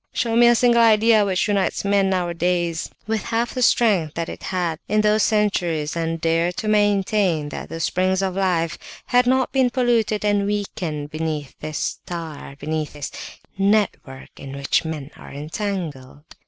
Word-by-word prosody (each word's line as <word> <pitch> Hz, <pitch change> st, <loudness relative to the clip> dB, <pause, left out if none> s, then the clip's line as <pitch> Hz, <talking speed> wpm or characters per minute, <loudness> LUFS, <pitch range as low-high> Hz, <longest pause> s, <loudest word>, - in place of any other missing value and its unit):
Show 230 Hz, -2 st, 0 dB
me 240 Hz, +1 st, +6 dB
a 240 Hz, -, +6 dB
single 235 Hz, 0 st, +4 dB
idea 220 Hz, -1 st, +5 dB
which 190 Hz, -1 st, 0 dB
unites 200 Hz, -1 st, 0 dB
men 200 Hz, -1 st, +2 dB
nowadays 175 Hz, -2 st, -1 dB, 0.2 s
with 220 Hz, 0 st, -2 dB
half 235 Hz, +1 st, -1 dB
the 255 Hz, -, -3 dB
strength 200 Hz, -11 st, +3 dB
that 165 Hz, 0 st, -3 dB
it -, -, -8 dB
had 175 Hz, -4 st, -2 dB
in 215 Hz, +1 st, +2 dB
those 215 Hz, 0 st, +3 dB
centuries, 175 Hz, -9 st, 0 dB
and 165 Hz, 0 st, -2 dB
dare 165 Hz, +1 st, +1 dB
to 215 Hz, -, -5 dB
maintain 200 Hz, -6 st, +2 dB
that -, -, -7 dB
the 165 Hz, -, -6 dB
'springs 185 Hz, +3 st, +1 dB
of 190 Hz, -1 st, -1 dB
life' 175 Hz, -4 st, 0 dB, 0.3 s
have 245 Hz, 0 st, +3 dB
not 260 Hz, 0 st, +2 dB
been 265 Hz, -2 st, +3 dB
polluted 235 Hz, -4 st, +1 dB
and 205 Hz, -1 st, +2 dB
weakened 170 Hz, -8 st, -3 dB
beneath 155 Hz, -3 st, -3 dB
this 155 Hz, 0 st, -5 dB
'star,' 160 Hz, -5 st, -5 dB
beneath 155 Hz, +1 st, -3 dB
this 145 Hz, -1 st, -6 dB, 0.5 s
network 195 Hz, -10 st, 0 dB
in 135 Hz, 0 st, -8 dB
which 140 Hz, +4 st, +1 dB
men 155 Hz, -3 st, -6 dB
are -, -, -12 dB
entangled! 150 Hz, -3 st, -5 dB
185 Hz, 165 wpm, -22 LUFS, 160-215 Hz, 0.5 s, me